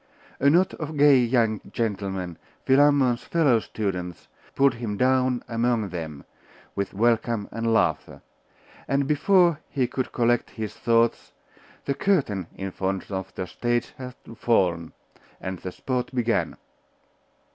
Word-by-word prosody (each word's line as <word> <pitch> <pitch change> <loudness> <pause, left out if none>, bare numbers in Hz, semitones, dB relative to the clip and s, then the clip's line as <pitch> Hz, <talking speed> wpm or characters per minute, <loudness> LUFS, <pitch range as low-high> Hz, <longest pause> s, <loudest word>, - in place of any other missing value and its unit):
A 140 - +5
knot 175 +5 +3
of 155 -1 -6
gay 145 -2 +6
young 115 -3 +1
gentlemen, 95 -6 -3 0.3
Philammon's 135 -3 +4
fellow 145 -9 +3
students, 90 -6 -4 0.3
pulled 135 -1 +4
him 115 -4 -4
down 130 0 +2
among 115 -2 0
them, 80 -5 -6 0.5
with 100 -1 -3
welcome 115 -1 +1
and 115 0 -1
laughter; 110 - 0 0.6
and 140 +1 +1
before 170 +1 +3
he 135 -3 0
could 130 +1 -3
collect 120 0 +1
his 110 -2 -6
thoughts, 115 0 +1 0.5
the 140 - 0
curtain 135 - 0
in 95 0 -5
front 95 +1 -3
of 95 -1 -4
the 95 - -3
stage 120 +5 -2
had 125 -1 -7 0.2
fallen, 90 -8 +1 0.5
and 95 -1 -5
the 90 - -6
sport 125 +4 -3
began. 120 -2 0
120 Hz, 130 wpm, -25 LUFS, 100-130 Hz, 0.6 s, gay